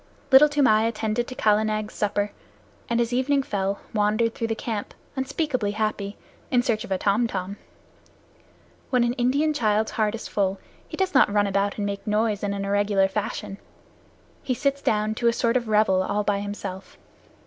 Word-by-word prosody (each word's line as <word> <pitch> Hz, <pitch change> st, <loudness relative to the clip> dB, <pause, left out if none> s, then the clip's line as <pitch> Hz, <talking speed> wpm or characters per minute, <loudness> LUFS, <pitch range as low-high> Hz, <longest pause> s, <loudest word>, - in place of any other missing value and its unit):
Little 280 Hz, +3 st, +8 dB
Toomai 240 Hz, -7 st, +3 dB
attended 225 Hz, +1 st, -1 dB
to 255 Hz, -, -7 dB
Kala 215 Hz, -2 st, +3 dB
Nag's 215 Hz, 0 st, -2 dB
supper, 205 Hz, 0 st, -1 dB, 0.6 s
and 235 Hz, 0 st, +1 dB
as 235 Hz, 0 st, 0 dB
evening 275 Hz, +2 st, +2 dB
fell, 200 Hz, -3 st, -2 dB
wandered 215 Hz, +2 st, +1 dB
through 230 Hz, -, -3 dB
the 225 Hz, -, -1 dB
camp, 220 Hz, -2 st, -5 dB, 0.2 s
unspeakably 265 Hz, -5 st, -1 dB
happy, 210 Hz, -1 st, -2 dB, 0.3 s
in 245 Hz, -1 st, +3 dB
search 225 Hz, -3 st, 0 dB
of 235 Hz, -, -10 dB
a 190 Hz, -, +2 dB
tom 210 Hz, +5 st, +2 dB
tom. 195 Hz, -1 st, -4 dB, 1.3 s
When 250 Hz, -2 st, +3 dB
an 240 Hz, 0 st, +1 dB
Indian 275 Hz, +5 st, +1 dB
child's 220 Hz, -5 st, +1 dB
heart 215 Hz, 0 st, 0 dB
is 230 Hz, -, -7 dB
full, 195 Hz, -1 st, 0 dB, 0.3 s
he -, -, -8 dB
does 380 Hz, -1 st, 0 dB
not 260 Hz, -6 st, +5 dB
run 205 Hz, 0 st, +3 dB
about 200 Hz, 0 st, 0 dB
and 205 Hz, -, -2 dB
make 200 Hz, 0 st, -3 dB
a -, -, 0 dB
noise 210 Hz, -1 st, +1 dB
in 205 Hz, -, -1 dB
an 200 Hz, 0 st, -3 dB
irregular 200 Hz, -1 st, +2 dB
fashion. 200 Hz, 0 st, -4 dB, 0.8 s
He 255 Hz, -, -1 dB
sits 280 Hz, +3 st, 0 dB
down 215 Hz, -2 st, +1 dB
to 235 Hz, +2 st, 0 dB
a 235 Hz, -, +4 dB
sort 235 Hz, 0 st, +1 dB
of 245 Hz, -2 st, 0 dB
revel 210 Hz, -3 st, +3 dB
all 205 Hz, +2 st, -1 dB
by 205 Hz, -1 st, 0 dB
himself. 200 Hz, -2 st, -6 dB
215 Hz, 185 wpm, -24 LUFS, 205-240 Hz, 1.3 s, Little